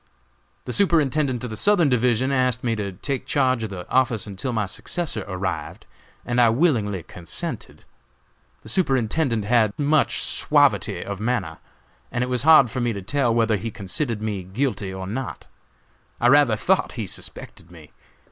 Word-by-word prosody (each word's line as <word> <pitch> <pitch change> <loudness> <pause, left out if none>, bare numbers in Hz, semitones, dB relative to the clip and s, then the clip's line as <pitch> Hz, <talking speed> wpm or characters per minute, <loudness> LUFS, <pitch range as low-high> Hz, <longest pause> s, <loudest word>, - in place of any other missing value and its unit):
"The 125 - -3
Superintendent 150 -8 +1
of 125 - -5
the - - -4
Southern 180 - +3
Division 125 0 +2
asked 125 -2 +1
me 115 -2 0
to 100 -3 -4
take 135 +8 -4
charge 130 -4 +1
of 110 - -3
the 90 -3 -7
office 125 -4 +1
until 100 +5 -4
my 110 -3 0
successor 170 - -3
arrived, 95 -1 -4 0.4
and 120 0 +1
I 115 - +6
willingly 110 - +1
consented. 85 0 -7 0.8
The 110 - -9
Superintendent 130 - +1
had 110 -2 +2
much 150 +1 +2
suavity - - +2
of 100 -1 -5
manner, 120 +3 -2 0.5
and 120 - -1
it 125 - -3
was 125 -2 +1
hard 145 -5 +6
for 130 - -3
me 120 -1 0
to 100 -2 -6
tell 130 +4 +1
whether 115 -2 +2
he 115 +4 -4
considered 110 +3 -3
me 105 -3 -2
guilty 100 +1 -3
or 95 0 -6
not. 125 +7 -5 0.7
I 120 - +4
rather 140 -5 +5
thought 185 - +1
he 115 -4 -4
suspected 85 -2 -8
me. 80 -4 -15
120 Hz, 165 wpm, -23 LUFS, 105-135 Hz, 0.8 s, I